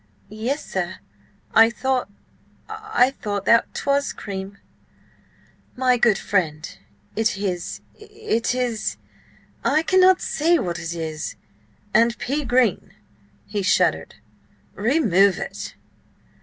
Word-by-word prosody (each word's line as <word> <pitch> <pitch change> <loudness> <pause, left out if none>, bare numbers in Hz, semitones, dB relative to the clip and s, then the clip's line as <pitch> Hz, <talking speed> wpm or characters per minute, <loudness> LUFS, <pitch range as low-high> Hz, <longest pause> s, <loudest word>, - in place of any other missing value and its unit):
"Yes, 235 +8 -3
sir. 185 -1 -3 0.6
I 225 0 +7
thought–I 265 - -2
thought 205 -2 -3
that 230 0 +4
'twas 280 0 0
cream!" 195 0 -7 1.2
"My 250 -1 +2
good 230 -4 +3
friend, 160 -6 -1 0.5
it 220 -2 +1
is–it 230 - -3
is–I 250 +5 -3
cannot 370 +1 +5
say 335 +3 +2
what 175 - -3
it 160 +1 -5
is. 160 -2 -4 0.6
And 235 0 +4
pea 285 +3 -2
green!" 245 -5 +1 0.5
he 205 -1 -3
shuddered. 190 - +1 0.6
"Remove 200 - +3
it." - - -6
230 Hz, 95 wpm, -22 LUFS, 195-280 Hz, 1.2 s, I